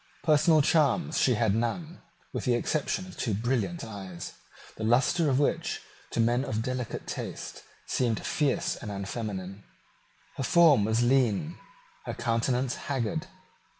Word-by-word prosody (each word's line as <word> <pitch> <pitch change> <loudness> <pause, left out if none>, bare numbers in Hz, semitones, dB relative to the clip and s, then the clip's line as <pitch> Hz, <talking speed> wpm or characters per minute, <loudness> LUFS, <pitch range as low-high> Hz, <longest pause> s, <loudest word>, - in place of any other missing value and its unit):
Personal 155 -1 +5
charms 160 +3 +2
she 125 - +4
had 110 -2 +2
none, 120 - -2 0.3
with - - -3
the 125 -2 +3
exception 155 +8 -1
of 185 - -11
two 110 -5 -1
brilliant 125 - -1
eyes, 95 -5 -7 0.4
the 110 - -6
lustre 135 - +3
of 130 - +2
which, 145 - 0 0.3
to - - -4
men 120 +3 +3
of 110 -5 -2
delicate 125 -1 -4
taste, - - -6 0.2
seemed 115 -4 0
fierce 145 -4 0
and 110 - -7
unfeminine. 100 -1 -5 0.7
Her 135 - -2
form 155 - +5
was 110 +2 +2
lean, 130 - +2 0.5
her - - -4
countenance 125 +2 0 0.2
haggard. 145 +6 -1
125 Hz, 140 wpm, -28 LUFS, 110-150 Hz, 0.7 s, Personal